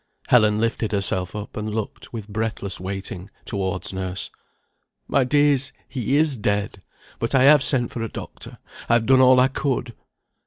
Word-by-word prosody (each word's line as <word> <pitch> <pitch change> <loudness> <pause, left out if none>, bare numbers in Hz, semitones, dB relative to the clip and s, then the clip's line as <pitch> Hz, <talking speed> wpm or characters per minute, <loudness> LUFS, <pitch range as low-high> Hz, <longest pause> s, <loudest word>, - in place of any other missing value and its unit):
Helen 110 -4 +5
lifted 115 0 -1
herself 95 -2 -1
up, 105 0 -7
and 105 0 -4
looked, 110 -2 -5
with 110 -4 -7
breathless 105 -2 -3
waiting, 95 +1 -6 0.2
towards 95 -2 -3
nurse. 95 0 -4 0.8
"My 140 - +2
dears, 145 0 +2
he 130 +1 -1
is 150 -4 +2
dead! 100 -2 -2 0.4
But 115 +4 -1
I 130 - +5
have 145 +1 +7
sent 130 -3 +2
for 120 - -5
a 115 - -3
doctor. - - -9 0.3
I - - +4
have 115 -1 +3
done 130 +1 +5
all 130 0 +6
I 130 - +5
could." 130 -3 -2
115 Hz, 165 wpm, -23 LUFS, 100-130 Hz, 0.8 s, have